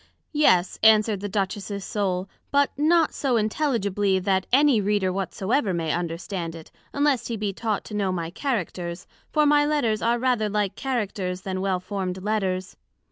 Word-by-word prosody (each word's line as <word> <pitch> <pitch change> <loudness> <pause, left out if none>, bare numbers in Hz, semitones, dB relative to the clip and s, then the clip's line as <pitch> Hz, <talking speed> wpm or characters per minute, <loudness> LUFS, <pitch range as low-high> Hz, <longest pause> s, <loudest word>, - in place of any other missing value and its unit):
Yes, 185 -12 +3
answered 215 -2 +5
the 205 +1 -4
Duchess's 200 0 -3
Soul, 190 -4 -1 0.2
but 285 0 +3
not 320 +2 +3
so 260 -4 0
intelligibly 210 -5 +1
that 190 0 0
any 270 -3 +5
Reader 200 -2 +1
whatsoever 195 +3 -1
may 165 -2 -1
understand 170 0 -3
it, 160 -1 -12 0.2
unless 285 -4 +1
he 230 - -3
be 205 -1 -2
taught 215 0 -2
to - - -9
know 200 -2 0
my 170 -2 -3
Characters; 180 - -3 0.3
for 300 -1 +3
my 295 0 +5
Letters 290 -8 +1
are 235 +1 +2
rather 240 -4 +1
like 205 -1 -1
Characters, 200 -8 -2
then 185 -1 -3
well 190 -2 0
formed 185 -1 -4
Letters. 190 -3 -1
205 Hz, 160 wpm, -25 LUFS, 185-240 Hz, 0.3 s, answered